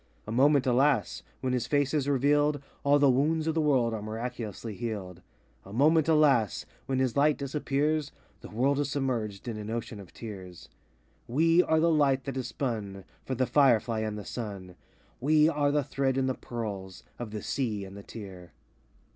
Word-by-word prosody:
A 105 - -6
moment, 140 +3 +4
alas! 130 -2 +2 0.2
When 130 -1 -1
his 120 -2 -1
face 145 -1 +1
is 145 -2 +1
revealed, 145 +2 +2 0.2
All 140 +1 +5
the 145 -1 +4
wounds 150 +5 +2
of 160 - 0
the 160 - +1
world 130 -6 +2
are 110 - -4
miraculously 115 0 -5
healed. 95 -4 -5 0.4
A 95 - -13
moment, 155 +7 +3
alas! 145 - +3 0.2
When 130 - 0
his 130 -2 0
light 145 +1 +3
disappears, 145 +1 -1 0.3
The - - -11
world 135 +6 +1
is 145 -1 0
submerged 120 -8 -2
in 115 -2 -3
an 105 0 -6
ocean 115 -2 -4
of 95 -3 -12
tears. 95 -6 -9 0.6
We 165 +7 +4
are 160 -2 +2
the 165 +1 +3
light 140 -4 +3
that 135 -2 -5
is 130 -2 -3
spun 105 -9 -4 0.2
For 130 - -2
the 130 +1 +1
firefly 120 -5 +3
and 110 -1 -3
the 105 - -7
sun; 100 -6 -6 0.4
We 150 +3 +4
are 145 -3 +1
the 145 0 +1
thread 135 -1 -1
in 135 - +1
the 130 - 0
pearls 100 -7 -6 0.2
Of 120 -2 -5
the 105 -1 -6
sea 110 -7 -2
and 95 +1 -11
the 100 - -8
tear. 95 -5 -10
130 Hz, 185 wpm, -28 LUFS, 110-145 Hz, 0.6 s, All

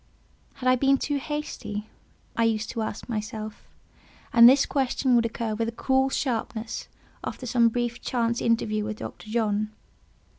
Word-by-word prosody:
Had 255 - -4
I 255 - +6
been 275 +2 +3
too 290 +2 -1
hasty? 270 -8 -4 0.5
I 230 - +2
used 220 -1 0
to 230 - -3
ask 215 -1 -4
myself; 215 -1 -5 0.7
and 235 0 +10
this 270 +2 +5
question 265 -1 +1
would 230 -1 +4
occur 225 -1 -3
with 225 +1 -1
a - - -2
cruel 265 +3 +2
sharpness 230 -4 -2 0.4
after 255 - -5
some 235 -1 +4
brief 240 0 -2
chance 235 -1 0
interview 215 -2 +1
with 215 0 -4
Dr. 215 - -8
John. 215 -2 0
230 Hz, 155 wpm, -26 LUFS, 220-255 Hz, 0.7 s, and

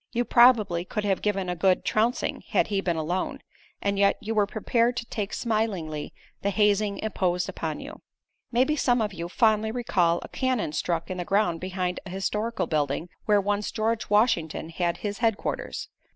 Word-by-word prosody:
You 240 0 +1
probably 220 -8 +5
could 210 +3 -3
have 195 -2 +1
given 205 -2 0
him 180 - -1
a - - -6
good 185 +2 +2
trouncing 230 +4 0
had - - +2
he 200 -2 0
been 175 -3 0
alone, 165 +4 -2 0.5
and 200 0 0
yet 200 0 +4
you 220 +2 -3
were 210 -2 +2
prepared 235 +3 +1
to 235 - -3
take 210 -3 -4
smilingly 195 -10 -2 0.3
the 200 - +1
hazing 205 0 +2
imposed 180 -4 -1
upon 155 -2 -4
you. 295 +3 -9 0.5
Maybe 255 +5 +3
some 245 -4 +2
of 210 -2 -1
you 170 -1 -5
fondly 220 +2 +3
recall 190 -8 +1
a - - -7
cannon 255 - -1
stuck 170 +2 -2
in 185 - -3
the 180 - -2
ground 195 -4 +1
behind 185 -1 -2
a 190 - -9
historical 210 +5 -2
building 150 +2 -1 0.2
where 210 -1 +4
once 205 +1 -1
George 220 +1 -1
Washington 190 -8 +2
had 170 0 -1
his 205 -1 -3
headquarters. 225 -3 -1
200 Hz, 180 wpm, -26 LUFS, 180-220 Hz, 0.5 s, probably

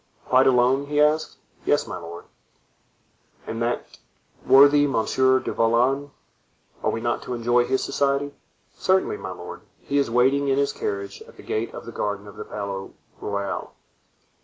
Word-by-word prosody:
"Quite 130 +1 +4
alone?" 130 +2 +3
he 145 0 0
asked. 150 +1 +2 0.3
"Yes, - - +2
my - - -6
lord." 85 +1 -9 1.2
"And 115 +1 -5
that 120 +1 -1 0.6
worthy 145 +2 +7
Monsieur 130 +1 +2
du - - -4
Vallon, 125 +5 +2 0.7
are - - +2
we 115 - -2
not 120 +1 -1
to 125 - -4
enjoy 120 +1 +2
his 130 +2 0
society?" 140 0 0 0.4
"Certainly, 190 - +1
my 95 -1 -7
lord; 90 -1 -8 0.2
he 140 0 -1
is 140 - +1
waiting 130 +4 +3
in 135 0 +2
his 140 0 +1
carriage 100 0 -4
at - - -17
the - - -12
gate 110 +2 -2
of - - -8
the 115 - -7
garden 105 -2 -3
of 100 - -11
the - - -6
Palais 100 -2 -5 0.3
Royal." 100 -1 -4
125 Hz, 160 wpm, -24 LUFS, 110-140 Hz, 1.2 s, worthy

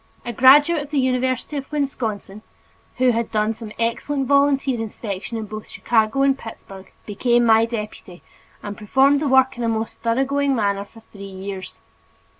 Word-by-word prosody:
A 240 - -4
graduate 290 +7 +6
of 285 - -8
the 300 - -2
University 255 +2 0
of 275 +1 -7
Wisconsin, 225 -8 -3 0.6
who 255 -1 +4
had 230 0 -2
done 215 0 0
some 220 -1 -10
excellent 265 +4 -1
volunteer 280 -2 +2
inspection 215 0 -5
in 220 - -4
both 215 +1 -8
Chicago 225 +3 +1
and 275 -1 +3
Pittsburg, 195 -6 -11
became 240 +3 +1
my 225 0 +5
deputy 210 -5 -7 0.4
and 205 -1 -6
performed 265 +7 +3
the 300 - 0
work 265 -2 +3
in - - -2
a 230 - +1
most 220 0 -3
thoroughgoing 270 +4 0
manner 200 -3 -1
for 225 +2 -17
three 200 -1 -10
years. 190 0 -8
235 Hz, 165 wpm, -21 LUFS, 215-270 Hz, 0.6 s, graduate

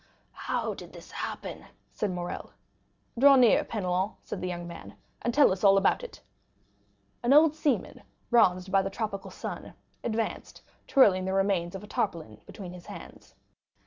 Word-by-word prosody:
"How - - -3
did - - -11
this - - -12
happen?" - - -6 0.3
said 210 - -2
Morrel. 175 -1 -5 0.7
"Draw 280 +1 +8
nearer, 245 -5 +5
Penelon," 185 -1 -2
said 200 - -6
the 185 - -2
young 175 -1 -4
man, 170 - -10 0.3
"and 240 - 0
tell 285 -1 +5
us 185 0 -3
all 195 -1 +7
about 195 - +2
it." - - -9 1.0
An 245 +3 +3
old 305 +1 +7
seaman, 305 -3 -1 0.3
bronzed 185 -5 +3
by 195 0 +4
the 195 - -3
tropical 195 -2 -4
sun, 185 - -7 0.3
advanced, 225 -1 -3 0.2
twirling 190 -9 +5
the 190 - -1
remains 195 -3 +1
of 195 - -7
a 210 - -12
hat 215 -7 +1 0.3
between 180 -3 -9
his 180 -1 -12
hands. - - -11
195 Hz, 160 wpm, -28 LUFS, 185-235 Hz, 1.0 s, Draw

